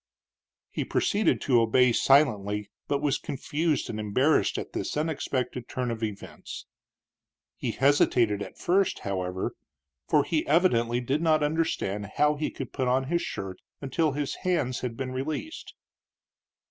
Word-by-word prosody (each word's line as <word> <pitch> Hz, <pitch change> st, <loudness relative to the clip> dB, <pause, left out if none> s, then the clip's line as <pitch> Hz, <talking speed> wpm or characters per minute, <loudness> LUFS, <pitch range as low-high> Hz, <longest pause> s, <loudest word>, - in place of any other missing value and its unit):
He -, -, -2 dB
proceeded 205 Hz, +2 st, +1 dB
to 125 Hz, -5 st, +4 dB
obey 125 Hz, +2 st, +4 dB
silently, 105 Hz, -7 st, +3 dB, 0.2 s
but 140 Hz, 0 st, -1 dB
was 145 Hz, -2 st, +1 dB
confused 150 Hz, +2 st, -1 dB
and 110 Hz, -, -4 dB
embarrassed 130 Hz, +9 st, +2 dB
at -, -, -6 dB
this -, -, -3 dB
unexpected 130 Hz, -5 st, -2 dB
turn 125 Hz, -2 st, -2 dB
of 115 Hz, -1 st, -5 dB
events. 105 Hz, -3 st, -6 dB, 0.9 s
He -, -, -3 dB
hesitated 120 Hz, -6 st, +3 dB
at -, -, -7 dB
first, 190 Hz, +2 st, +1 dB
however, 95 Hz, -1 st, -2 dB, 0.6 s
for 150 Hz, -2 st, +4 dB
he 155 Hz, +2 st, 0 dB
evidently 120 Hz, -8 st, +3 dB
did 135 Hz, +5 st, -1 dB
not 155 Hz, -2 st, +3 dB
understand 145 Hz, -10 st, -1 dB
how 150 Hz, 0 st, +4 dB
he 150 Hz, +1 st, -2 dB
could 135 Hz, -, -7 dB
put 130 Hz, -2 st, -1 dB
on 130 Hz, +2 st, +1 dB
his 170 Hz, 0 st, +1 dB
shirt 95 Hz, -1 st, -5 dB, 0.2 s
until 145 Hz, +2 st, 0 dB
his 145 Hz, -1 st, -3 dB
hands 145 Hz, -9 st, 0 dB
had 120 Hz, -2 st, -4 dB
been 130 Hz, -1 st, -3 dB
released. 155 Hz, -, -5 dB
135 Hz, 145 wpm, -27 LUFS, 115-150 Hz, 0.9 s, to